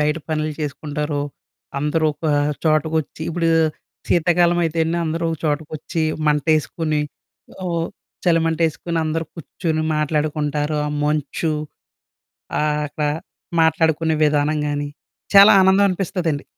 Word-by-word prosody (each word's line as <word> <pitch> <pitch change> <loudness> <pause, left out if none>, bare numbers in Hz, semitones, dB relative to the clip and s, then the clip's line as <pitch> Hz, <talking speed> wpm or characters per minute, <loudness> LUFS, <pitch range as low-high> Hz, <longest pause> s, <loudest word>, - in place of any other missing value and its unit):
బయట 150 +2 +1
పనులు 155 -1 -1
చేసుకుంటారో, 150 0 -3 0.6
అందరూ 150 +2 0
ఒక 160 - -6 0.4
చోటకొచ్చి, 155 0 0
ఇప్పుడు 165 0 0 0.6
శీతాకాలం 175 +1 +3
అయితేనే, 165 +1 0
అందరూ 165 +1 -2
ఒక 160 - -2
చోటకొచ్చి, 155 +2 -2 0.2
మంటేసుకుని, 155 +1 +1 0.6
అవొ 170 -2 -1 0.5
చలి‌మంటేసుకుని, 165 0 +1
అందరూ 160 +1 -1
కూర్చొని, 160 -1 -3
మాట్లాడుకుంటారు 150 0 0
ఆ - - -2 0.2
మంచు 155 +2 -1 1.1
ఆహ్, 150 0 +1
అక్కడ 150 +1 -2 0.5
మాట్లాడుకునే 160 0 +2
విధానం 150 +1 +2
గాని, 145 0 -2 0.4
చాలా 200 +1 +9
ఆనందం 190 +2 +5
అనిపిస్తదండి. 175 -5 -2
155 Hz, 100 wpm, -21 LUFS, 150-165 Hz, 1.1 s, చాలా